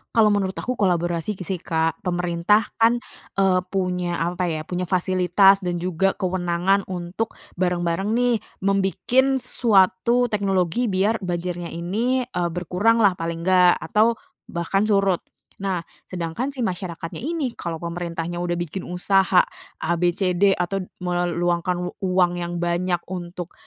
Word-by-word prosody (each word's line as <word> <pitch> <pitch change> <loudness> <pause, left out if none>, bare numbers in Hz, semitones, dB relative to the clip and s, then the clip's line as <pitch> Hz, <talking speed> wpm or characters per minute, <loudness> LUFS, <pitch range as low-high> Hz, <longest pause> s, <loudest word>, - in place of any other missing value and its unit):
Kalau 225 -2 +6
menurut 200 -2 +1
aku 250 - -2
kolaborasi 175 -1 0
sih, 185 -1 -4
Kak. 160 -1 -1
Pemerintah 180 +3 +1 0.2
kan, 230 +2 +5 0.4
eee, 190 -2 +4
punya 180 -2 -1
apa 175 +1 -1
ya, 155 -1 -4
punya 180 0 -3
fasilitas 185 +2 +3
dan 175 -1 -2
juga 185 +2 0
kewenangan 185 +1 +1
untuk 180 +5 -3 0.2
bareng-bareng 180 +2 0
nih, 240 +1 +2 0.2
membikin 200 +8 +2
suatu 235 -1 +3
teknologi 200 0 0
biar 200 +4 +1
banjirnya 175 -1 -3
ini, 230 +10 -1
eee, 180 -8 -2
berkuranglah 190 +5 +2
paling 165 0 -4
nggak, 180 -1 +5
atau 220 +2 +2 0.3
bahkan 170 +3 0
surut. 195 -4 +2 0.4
Nah, 190 -3 -2 0.2
sedangkan 175 +8 -3
si 245 - -1
masyarakatnya 175 -4 -4
ini, 295 -2 -2
kalau 170 -7 -5
pemerintahnya 170 0 -4
udah 175 0 -1
bikin 175 +2 -4
usaha 185 +1 +3 0.4
A, 170 - +1
B, 175 - +4
C, 185 -2 +1
D, 195 +2 +3
atau 195 +2 -1 0.2
meluangkan 175 0 0 0.2
uang 185 -2 +2
yang 175 0 -4
banyak 175 +1 0
untuk, 175 -1 -6
180 Hz, 135 wpm, -23 LUFS, 175-200 Hz, 0.4 s, Kalau